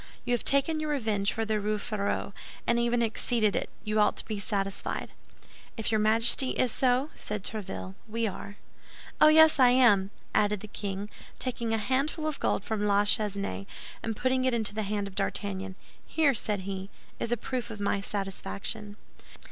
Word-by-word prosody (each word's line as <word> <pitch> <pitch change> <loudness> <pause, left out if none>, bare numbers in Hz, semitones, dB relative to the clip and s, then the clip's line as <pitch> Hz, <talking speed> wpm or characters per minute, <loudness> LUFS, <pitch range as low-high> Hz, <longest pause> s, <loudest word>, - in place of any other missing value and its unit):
You 245 - +1
have 240 - 0
taken 280 +3 +3
your 310 0 -2
revenge 220 -8 +1
for 225 - -2
the 215 -1 0
Rue 210 +1 0
Férou, 205 -2 -2 0.3
and 235 0 +2
even 235 0 +2
exceeded 225 -1 +1
it; - - -1
you 215 0 0
ought 210 - +3
to - - -3
be 215 -2 -3
satisfied." 195 -1 -2 0.7
"If 225 0 -2
your 220 - +3
Majesty 225 +4 +4
is 250 - +2
so," 260 +5 +2
said 210 -2 -4
Tréville, 195 -3 -5
"we 230 +1 -1
are." 200 0 -5 0.7
"Oh, - - +9
yes; 315 -1 +7
I 255 -1 +8
am," 230 -7 +5 0.2
added 205 -1 +2
the 215 - -7
king, 200 -1 -4 0.3
taking 240 -2 -3
a 225 - +2
handful 270 +8 0
of 310 -2 -2
gold - - 0
from 220 -1 -2
La 205 0 +4
Chesnaye, 200 - -1 0.3
and 225 -2 -3
putting 255 0 +1
it 255 -2 +2
into 220 -3 -1
the 215 - -1
hand 205 -1 -1
of 195 - -10
D'Artagnan. 195 -1 -3 0.3
"Here," 305 -4 +2
said 210 -3 -1
he, 190 0 -5 0.3
"is 230 - -2
a 240 - +2
proof 250 +1 -3
of 210 - -7
my 200 0 0
satisfaction." 200 - -5
215 Hz, 180 wpm, -29 LUFS, 200-245 Hz, 0.7 s, Oh